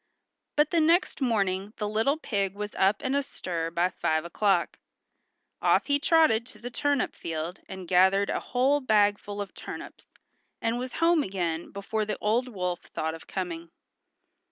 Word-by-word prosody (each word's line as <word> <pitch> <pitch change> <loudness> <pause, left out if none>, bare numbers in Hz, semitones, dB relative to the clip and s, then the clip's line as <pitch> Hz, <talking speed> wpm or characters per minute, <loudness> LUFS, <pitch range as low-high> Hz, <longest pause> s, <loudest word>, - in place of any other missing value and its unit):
But 295 0 +3
the 340 - +3
next 335 0 +2
morning 200 -4 0
the 210 - -2
little 225 +8 +1
pig 200 -9 -2
was 210 0 -5
up 195 +2 +3
and 260 +1 -1
astir 175 -12 -2
by 170 +2 +1
five 160 -2 -1
o'clock. 185 0 +1 0.8
Off - - +3
he 285 0 +2
trotted 290 -8 +4
to - - -12
the 245 +1 -7
turnip 285 0 0
field 165 +2 -4
and 190 -2 -7
gathered 190 +3 +4
a - - 0
whole 265 +4 +2
bagful 205 -3 +2
of 200 -1 -5
turnips - - -9 0.5
and 230 +1 -1
was 255 0 -5
home 335 -1 +3
again 175 - -2
before 205 +2 -3
the 210 -1 -3
old 230 +4 +1
wolf 180 -6 -3
thought 160 0 -4
of 165 - -11
coming. 170 -3 -4
205 Hz, 160 wpm, -27 LUFS, 185-255 Hz, 0.8 s, trotted